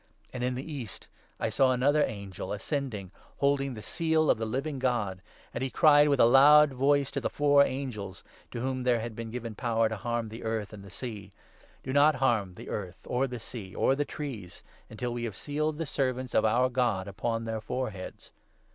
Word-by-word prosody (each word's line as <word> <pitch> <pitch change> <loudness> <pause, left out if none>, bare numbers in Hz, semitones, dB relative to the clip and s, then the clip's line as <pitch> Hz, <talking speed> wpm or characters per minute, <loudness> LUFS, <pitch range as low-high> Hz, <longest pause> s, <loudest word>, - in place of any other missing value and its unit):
And, 125 -1 -4
in 125 0 0
the 130 - -4
east, 140 -10 -7 0.3
I - - 0
saw 130 +4 +3
another 145 +4 +3
angel, 100 -3 -5
2 - - -3
ascending, 105 - -3 0.3
holding 140 -2 +1
the 110 - -9
seal 160 -2 +2
of - - 0
the 110 - -2
Living 135 +5 -3
God; 110 -8 -1 0.3
and - - -4
he 135 - -1
cried 150 0 +6
in 140 -2 +2
a - - +7
loud 145 +4 +7
voice 140 +1 +2
to 140 - -3
the - - -1
four 145 -1 +4
angels, 120 -9 -4 0.3
to 120 - -5
whom 130 0 -2
there 125 -2 +2
had 115 0 -5
been 115 0 -6
given 115 -1 -5
power 115 -1 +1
to 110 - -3
harm 120 +1 -2
the 115 +2 -9
earth 110 -2 -3
and 100 -2 -10
the 100 - -11
sea 105 -4 -7
— - - -29
' - - -31
Do 130 - -4
not 145 +2 +5
harm 110 -9 +1
the - - -10
3 - - -6
earth, 95 -4 -6
or 130 +2 +1
the 125 -1 -5
sea, 110 -4 -8
or - - +3
the 145 - 0
trees, 125 - -7 0.3
until 120 +2 -4
we 120 0 -3
have 110 -4 -5
sealed 150 +3 -2
the 165 - -2
servants 130 -3 -2
of - - +3
our 125 +4 +3
God 120 -7 0
upon 115 +3 -2
their 110 -1 -3
foreheads.' 110 -4 -5
125 Hz, 220 wpm, -29 LUFS, 110-140 Hz, 0.3 s, a